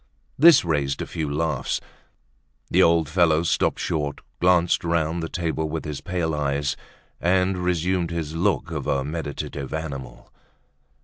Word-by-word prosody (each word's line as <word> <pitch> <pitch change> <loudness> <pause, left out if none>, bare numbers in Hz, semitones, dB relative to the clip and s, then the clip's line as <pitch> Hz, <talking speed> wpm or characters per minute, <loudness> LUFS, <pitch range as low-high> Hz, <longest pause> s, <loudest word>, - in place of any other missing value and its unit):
This 160 - +7
raised 70 -4 0
a - - -5
few 75 -3 -4
laughs. 80 +2 -1 0.9
The - - +5
old 85 -2 +4
fellow 80 0 +3
stopped 85 - +1
short, 75 -2 -2 0.2
glanced 90 -1 +3
round 85 0 0
the 80 - -4
table 80 -2 -2
with 80 +1 -4
his 75 -2 -5
pale 85 -3 -2
eyes 70 -1 -1 0.4
and 90 +1 +2
resumed 90 0 0
his 80 -2 -4
look 85 -4 0
of - - -4
a 70 -1 +1
meditative 75 -2 -5
animal. 70 -6 -7
80 Hz, 140 wpm, -24 LUFS, 75-85 Hz, 0.9 s, This